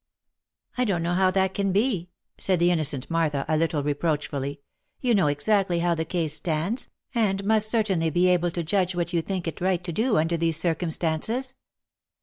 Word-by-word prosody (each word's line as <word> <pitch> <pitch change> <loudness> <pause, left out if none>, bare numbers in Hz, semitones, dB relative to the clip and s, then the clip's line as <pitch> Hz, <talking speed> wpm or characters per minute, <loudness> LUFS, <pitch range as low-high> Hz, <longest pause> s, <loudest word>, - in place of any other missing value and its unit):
" - - -35
I - - +4
don't 185 -8 0
know 170 +1 0
how 185 +1 +3
that 190 0 +1
can 200 -1 0
be," 200 -4 0 0.3
said 185 -2 +2
the 175 +1 +3
innocent 145 -6 0
Martha 155 -4 0
a 155 - +1
little 155 -2 0
reproachfully. 145 -1 -2 0.2
" - - -51
You 245 -2 +1
know 190 -7 +3
exactly 175 +5 +1
how 170 0 +1
the 160 -1 -2
case 160 -3 -1
stands, 170 +9 -1 0.2
and 200 -5 +1
must 215 0 +4
certainly 195 -8 +1
be 175 +3 +2
able 175 -1 +2
to 170 0 -3
judge 185 +2 0
what 175 0 -2
you 170 - +2
think 185 0 -4
it 165 - -5
right 185 -1 +1
to 175 - -4
do 220 +5 +1
under 165 +2 +1
these 165 -1 +1
circumstances." 170 - -1
175 Hz, 195 wpm, -25 LUFS, 160-195 Hz, 0.3 s, I